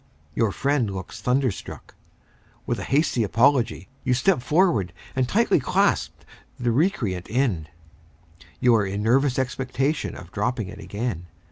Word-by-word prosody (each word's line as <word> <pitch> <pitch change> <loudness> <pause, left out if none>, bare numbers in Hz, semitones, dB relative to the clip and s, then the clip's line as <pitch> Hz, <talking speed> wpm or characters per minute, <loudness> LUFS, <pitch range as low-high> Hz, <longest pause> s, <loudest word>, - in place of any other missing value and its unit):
Your 110 +4 +1
friend 140 -1 0
looks 95 +2 -7
thunderstruck. 125 -2 -2 0.7
With - - -2
a - - -4
hasty 140 -3 +1
apology, 115 - +2 0.2
you 125 -2 +2
step 130 +3 +2
forward 130 - +2 0.2
and 130 -1 +1
tightly 230 -5 +3
clasp 125 - +1 0.4
the 120 -1 +1
recreant 115 - 0
end. 110 - 0 0.9
You 125 -1 +4
are 110 -2 +4
in 100 +2 -3
nervous 130 +3 +3
expectation 135 +3 -1
of 90 0 -11
dropping 105 -1 -2
it 105 0 -10
again. 100 -4 -4
120 Hz, 135 wpm, -24 LUFS, 105-135 Hz, 0.9 s, You